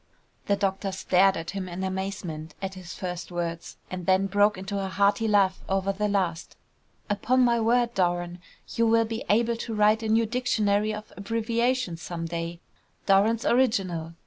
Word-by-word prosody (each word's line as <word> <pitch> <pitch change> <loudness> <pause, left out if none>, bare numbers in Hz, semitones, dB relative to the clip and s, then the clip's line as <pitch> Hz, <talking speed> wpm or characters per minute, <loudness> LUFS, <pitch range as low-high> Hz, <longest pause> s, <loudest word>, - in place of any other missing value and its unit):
The 200 - +3
doctor 195 0 -1
stared 190 0 +3
at 165 0 -5
him 190 -1 -5
in 180 +2 -5
amazement 190 -5 -4
at 190 -1 -4
his 185 -2 -9
first 180 -1 -5
words, 170 -1 -4
and 180 -2 -6
then 190 +1 +4
broke 205 +1 +3
into 195 +1 -3
a - - -2
hearty 200 +4 +2
laugh 195 -3 +3
over 195 0 0
the 210 +2 -1
last. 185 -5 -1 0.5
"Upon 225 +5 +1
my 235 -1 +3
word, 235 +1 +2
Doran, 175 -2 -1 0.3
you 230 0 +2
will 230 0 +4
be 225 0 -4
able 230 +2 +2
to 225 -1 -5
write 210 +1 +4
a 220 - -3
new 225 +1 +3
dictionary 215 -3 +1
of 215 0 -7
abbreviations 230 -1 -1
some 170 -2 -5
day! 170 0 -5 0.4
Doran's 210 +4 +3
Original! 185 -10 +1
195 Hz, 170 wpm, -26 LUFS, 180-220 Hz, 0.5 s, then